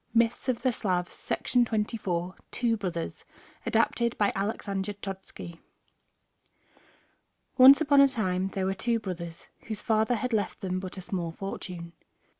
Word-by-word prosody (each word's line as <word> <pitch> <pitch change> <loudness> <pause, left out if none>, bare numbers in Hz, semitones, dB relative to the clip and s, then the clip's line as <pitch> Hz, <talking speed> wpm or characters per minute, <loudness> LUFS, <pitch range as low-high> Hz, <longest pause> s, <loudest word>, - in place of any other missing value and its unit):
MYTHS 235 +2 +2
OF 245 - 0
THE 255 - +3
SLAVS 180 -5 -2
THE 210 -7 0 0.2
TWO 235 -2 +1
BROTHERS 180 -5 -4 0.4
ADAPTED 235 -1 +2
BY 205 -1 +3
ALEXANDER 200 0 -2
CHODSKO 190 -4 -8 2.0
Once 265 +2 +10
upon 285 -2 +6
a 275 - +8
time 190 -7 -1
there 195 -1 -2
were 190 - +1
two 230 +4 0
brothers 170 -5 -6 0.2
whose 215 -1 -4
father 220 +1 +2
had 235 +2 -2
left 210 -2 -1
them 185 -1 -1
but 185 0 -7
a - - -5
small 175 -2 -3
fortune. 175 -2 -6
200 Hz, 135 wpm, -28 LUFS, 185-230 Hz, 2.0 s, Once